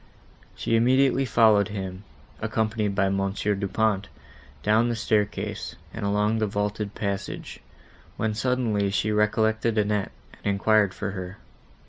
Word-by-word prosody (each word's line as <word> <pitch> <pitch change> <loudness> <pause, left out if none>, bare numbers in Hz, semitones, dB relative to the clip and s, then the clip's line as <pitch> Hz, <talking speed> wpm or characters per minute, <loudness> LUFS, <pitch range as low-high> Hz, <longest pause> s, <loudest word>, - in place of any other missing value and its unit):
She 115 - 0
immediately 130 +3 +3
followed 110 -4 +4
him, 95 -2 -6 0.4
accompanied 110 -2 -1
by 95 0 +2
Mons. 95 +1 -1
Du 100 -1 0
Pont, 105 -1 0 0.6
down 110 +3 +3
the 120 - 0
staircase, 105 -2 -1 0.2
and 110 - -5
along 105 +2 +1
a 110 - +2
vaulted 105 0 -2
passage, 100 -2 -4 0.6
when 110 -1 0
suddenly 110 -3 0
she 110 +2 0
recollected 110 +1 +1
Annette, 105 -1 +1 0.3
and - - -3
enquired 105 -1 +3
for 100 -1 -3
her. 95 0 -6
105 Hz, 130 wpm, -25 LUFS, 100-110 Hz, 0.6 s, followed